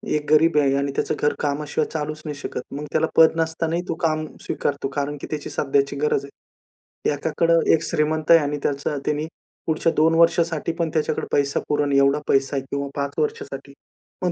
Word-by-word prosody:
एक 150 -1 -2
गरीब 155 +1 +5
आहे 135 -2 +2
आणि 140 0 -1
त्याचं - - 0
घर 150 - +2
कामाशिवाय 150 +1 -1
चालूच 155 0 -3
नाही 150 -2 -4
शकत. 145 - -5
मग 150 +1 -5
त्याला 160 - +2
पद 160 0 +6
नसतानाही 165 +1 -1
तो - - -1
काम 155 -1 0 0.2
स्वीकारतो, 140 -1 -2
कारण 145 0 -2
की - - -6
त्याची 150 -2 -4
सध्याची 140 0 0
गरज 145 -2 +1 0.6
आहे. - - -4
एकाकडं 165 +3 +2
एक 160 - +2
श्रीमंत 155 +1 0
आहे 165 - +9
आणि 145 -1 -2
त्याचं 145 +1 -1
त्यानी 150 +1 0 0.4
पुढच्या 160 +1 +1
2 160 +1 +4
वर्षासाठी 165 -1 +2
पण 170 -2 -1
त्याच्याकडे 155 -1 0
पैसा 140 0 +1
पुरेल 145 -1 +1
एवढा 140 +1 +4
पैसा 135 +1 +2
आहे 135 - -1
किंवा 140 0 -2
5 140 0 -2
वर्षासाठी. 445 -1 -3 0.5
पण 180 -1 +1
150 Hz, 185 wpm, -23 LUFS, 145-160 Hz, 0.6 s, आहे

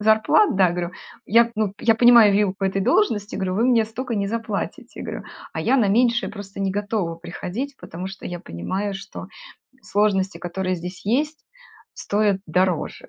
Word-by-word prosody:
зарплат, 220 - +4
да. 185 -3 +4
Говорю: 175 0 -3 0.4
"Я, 235 +2 +4
ну, 210 -2 0
я 225 -1 +4
понимаю 235 -3 +7
вилку 200 -1 +1
этой 195 +1 0
должности". 220 - +1
Говорю: 185 -1 -2
"Вы 230 - +2
мне 235 -3 +4
столько 240 +1 -4
не 200 -1 -1
заплатите"- 220 -1 -4
говорю. - - -6 0.3
А - - -2
я 270 - +3
на 210 - +3
меньшее 235 +3 +2
просто 200 -1 -9
не 195 -1 0
готова 200 -4 -2
приходить, 195 +11 -6
потому 180 +3 -7
что 190 0 -8
я 175 -1 -6
понимаю, 190 - -4
что 195 +2 -8 0.6
сложности, 200 -2 +1
которые 185 +1 -3
здесь 180 +2 -8
есть, 300 +8 -1 0.5
стоят 205 -2 0
дороже". 180 0 0
200 Hz, 165 wpm, -22 LUFS, 190-225 Hz, 0.6 s, понимаю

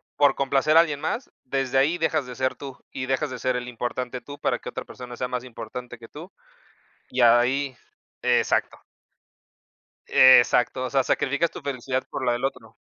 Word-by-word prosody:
por 140 -2 +4
complacer 140 +3 +1
a - - +10
alguien 150 -4 -2
más, 195 - -3 0.2
desde 135 0 -1
ahí 155 +6 +3
dejas 155 -4 0
de 125 -1 -9
ser 130 0 -1
tú, 135 -2 -9
y 130 - -4
dejas 135 +2 -1
de 130 - -6
ser 130 +1 0
el 125 0 -4
importante 125 +1 -4
tú 145 0 -10
para - - 0
que - - -12
otra - - -6
persona 125 -1 -9
sea 125 - -3
más 125 0 -3
importante 120 +1 -8
que 115 - -12
tú, 165 +6 -10 0.8
y 130 - -2
ahí 125 +3 +3 0.5
exacto. - - +1 1.3
Exacto, 130 0 +5
o 125 - -3
sea, 135 0 +3
sacrificas 145 +5 0
tu - - -9
felicidad 130 -1 -2
por 135 - -4
la 120 - +2
del 120 +2 -3
otro. 125 -5 -4
130 Hz, 185 wpm, -24 LUFS, 125-140 Hz, 1.3 s, a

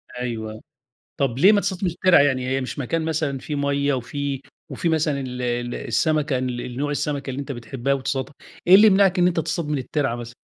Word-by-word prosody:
أيوه، 110 -3 -5 0.6
طب 130 -3 0
ليه 190 +8 +7
ما 205 -1 +3
تصطادش 190 0 -3
من 180 - +2
الترعة 180 +1 +4
يعني 130 -3 +1
هي 135 +1 0
مش 130 - -5
مكان 160 +5 -1
مثلًا 155 -4 -1
فيه 150 - -5
مَيَّه 140 0 0
وفي 140 +2 -3 0.3
وفي 170 - -2
مثلًا 155 -3 +1
ال 125 -1 -5
ال 120 0 -2
السَمَكة 150 +3 0
ال 125 -1 -4
نوع 145 +1 -1
السَمَكة 145 -1 -2
اللي 130 +2 -4
أنت 140 0 -5
بتحبها 130 +2 -2
وتصطادها؟ 135 +1 -3 0.3
إيه 185 - +9
اللي 215 +2 +8
يمنعك 195 -2 +4
إن 175 - +5
أنت 170 -2 0
تصطاد 165 0 -2
من 150 - 0
الترعة 135 -1 -1
مثلًا؟ 120 0 -8
140 Hz, 205 wpm, -23 LUFS, 125-160 Hz, 0.6 s, إيه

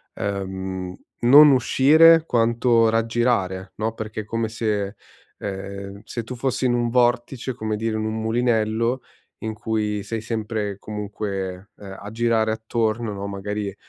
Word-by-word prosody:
ehm, 95 -2 -4 0.3
non 145 +5 +8
uscire 155 +6 +6
quanto 115 -2 +3
raggirare, 115 -5 0
no, 110 +1 -2
perché 110 -1 -5
è - - -11
come 115 0 -2
se 105 -3 -2 0.4
ehm, 100 0 -6
se 120 0 -5
tu 125 +2 -7
fossi 130 +1 -1
in 120 - +3
un 120 -1 +1
vortice, 120 +1 +1
come 110 -2 -3
dire, 110 0 -2
in 110 - -2
un 110 0 -2
mulinello 115 +1 +1 0.4
in 110 -1 -3
cui 105 -1 -2
sei 115 +1 -4
sempre, 110 -3 -3
comunque, 100 -2 -5
ehm, 95 -1 -9
a 100 - -7
girare 115 -1 +1
attorno, 110 0 -1
no, 100 0 -5
magari 100 0 -4
110 Hz, 145 wpm, -23 LUFS, 100-120 Hz, 0.4 s, non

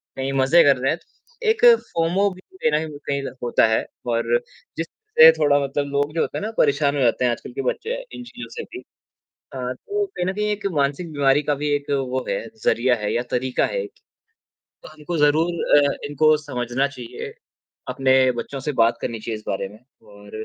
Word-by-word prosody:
कहीं 135 +1 -3
मज़े 135 +6 +5
कर 140 -2 +5
रहे 130 +1 0
हैं, - - -1
तो 475 -1 -12
एक 445 +2 +3 0.3
फ़ोमो 175 +5 +2
भी 185 - -12 0.2
कहीं - - +2
न 150 - +3
कहीं 150 -2 -8
कहीं 140 -1 -1 0.2
होता 120 - +3
है 110 - +1 0.3
और 115 - +2 0.4
जिस - - -1 0.3
से 475 0 +11
थोड़ा 145 0 +4
मतलब 140 +1 -2
लोग 145 +1 0
जो - - +1
होते - - -2
हैं 205 - -4
ना 220 - -3
परेशान 145 0 +2
हो 140 - 0
जाते 125 +1 +2
हैं 120 - +3
आजकल 120 - -6
के - - -3
बच्चे 455 - -2 0.2
इन 245 - -8
चीज़ों 245 0 -10
से 460 - -5
भी। 370 - -9 0.7
अ, - - -6 0.2
तो 410 - -3
कहीं 375 - -4
न 185 - -1
कहीं 210 +1 -2
एक 205 -1 -4
मानसिक 145 +4 -1
बीमारी 140 0 +3
का 145 +1 0
भी 150 +1 -3
एक 145 0 -4 0.2
वो 130 0 -2
है, - - 0 0.2
ज़रिया 125 +1 +3
है 105 - -1
या 120 - +1
तरीक़ा 125 +1 0
है - - -2
एक 410 - -9 0.9
तो - - -11
हमको 155 +2 -6
ज़रूर 160 +4 +2 0.3
अ, - - -3
इनको 155 +2 +4
समझना 125 0 -1
चाहिए 125 -4 -8 0.6
अपने 130 -1 +2 0.3
बच्चों 140 - -8
से - - +1
बात 115 +1 +2
करनी 115 -2 -4
चाहिए 110 0 -4
इस 110 - -17
बारे 95 0 -2
में 105 - -15 0.3
और 100 0 -15
145 Hz, 210 wpm, -22 LUFS, 130-175 Hz, 0.9 s, से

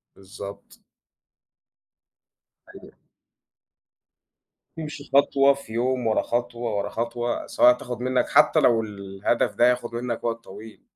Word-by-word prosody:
بالضبط. 100 +1 -11 2.0
أيوه. - - -13 1.9
يمشِي 150 -2 -7
خطوة 140 0 +5
في 135 -5 -11
يوم، 125 0 0
ورا 110 - +2
خطوة، 120 -2 -3
ورا 100 0 -2
خطوة، 120 +1 -3
سواء 125 - +5
هتاخد 125 -1 -4
منك 130 0 0
حتى - - +5
لو 115 -2 +4
الهدف 100 +1 -2
ده 120 - +4
هياخد 125 -1 0
منك 120 -1 -4
وقت 115 0 -3
طويل. 105 +3 -12
120 Hz, 115 wpm, -24 LUFS, 110-125 Hz, 2.0 s, خطوة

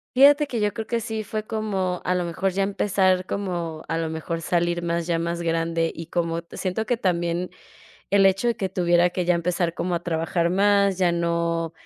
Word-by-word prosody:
Fíjate 290 +3 +7
que 245 -5 -3
yo 210 -1 +1
creo 220 -2 -4
que 235 -1 -1
sí 220 -1 -4
fue 215 +1 -4
como 195 -5 -2
a 180 - +2
lo 180 -1 0
mejor 185 +3 -1
ya 195 +2 -1
empezar 195 -2 +1
como 175 -6 -3
a 165 - -1
lo 165 -1 -2
mejor 165 +1 -4
salir 175 0 0
más 170 0 -1
ya 170 -1 +1
más 170 +1 -2
grande, 165 0 0
y 165 - -8
como 170 -1 -1
siento 195 +4 -2
que 245 +1 0
también 175 -3 -1 0.6
el 195 -1 +5
hecho 195 +5 +2
de 235 - 0
que 190 - -2
tuviera 175 -1 +3
que 180 0 -2
ya 175 0 +3
empezar 170 0 0
como 180 0 -2
a 170 - -2
trabajar 170 0 0
más, 200 0 +3
ya 175 -2 +3
no, 170 -1 -1
180 Hz, 210 wpm, -24 LUFS, 170-200 Hz, 0.6 s, Fíjate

